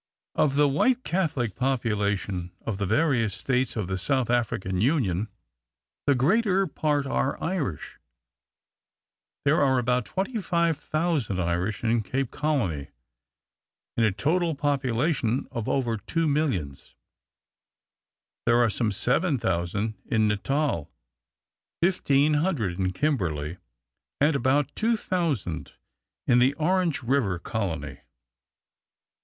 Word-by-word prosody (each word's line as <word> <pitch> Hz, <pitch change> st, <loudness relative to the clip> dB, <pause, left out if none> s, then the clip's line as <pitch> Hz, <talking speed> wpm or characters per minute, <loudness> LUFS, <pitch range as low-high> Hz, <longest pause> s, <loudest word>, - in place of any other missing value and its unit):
Of 145 Hz, -3 st, +2 dB
the 145 Hz, 0 st, +5 dB
white 250 Hz, -, +2 dB
Catholic 145 Hz, -, -1 dB
population 105 Hz, -7 st, -1 dB
of 105 Hz, -4 st, -3 dB
the 100 Hz, -, -1 dB
various 115 Hz, -, +2 dB
states 125 Hz, +5 st, 0 dB
of 110 Hz, -4 st, -1 dB
the 95 Hz, 0 st, -2 dB
South 130 Hz, +3 st, +1 dB
African 95 Hz, -6 st, 0 dB
Union, 110 Hz, -, +1 dB, 0.8 s
the 140 Hz, -, +5 dB
greater 195 Hz, -, +3 dB
part 150 Hz, -3 st, 0 dB
are 135 Hz, 0 st, 0 dB
Irish. 155 Hz, -, -3 dB, 1.5 s
There 155 Hz, +5 st, +4 dB
are 130 Hz, -2 st, +3 dB
about 125 Hz, -1 st, +1 dB
25,000 170 Hz, -, -1 dB
Irish 90 Hz, +5 st, -1 dB
in 115 Hz, 0 st, +2 dB
Cape 130 Hz, +3 st, -2 dB
Colony 115 Hz, -, -1 dB, 1.1 s
in 115 Hz, -, +2 dB
a 110 Hz, -, +4 dB
total 160 Hz, -, +1 dB
population 135 Hz, -2 st, 0 dB
of 115 Hz, -4 st, -3 dB
over 120 Hz, -4 st, 0 dB
two 160 Hz, -, -1 dB
millions. 130 Hz, -, -2 dB, 1.5 s
There 120 Hz, 0 st, +5 dB
are 120 Hz, -2 st, +3 dB
some 110 Hz, +1 st, 0 dB
7,000 105 Hz, -, 0 dB
in 110 Hz, -1 st, +2 dB
Natal, 105 Hz, -, 0 dB, 0.9 s
I,500 145 Hz, -, +2 dB
in 95 Hz, -1 st, +1 dB
Kimberley, 90 Hz, -, -1 dB, 0.6 s
and 150 Hz, +2 st, +3 dB
about 135 Hz, +1 st, +1 dB
2,000 170 Hz, -, -1 dB, 0.5 s
in 120 Hz, -, +4 dB
the 130 Hz, +3 st, +3 dB
Orange 170 Hz, -2 st, +1 dB
River 120 Hz, -7 st, +1 dB
Colony. 85 Hz, -, -4 dB
125 Hz, 105 wpm, -26 LUFS, 100-150 Hz, 1.5 s, the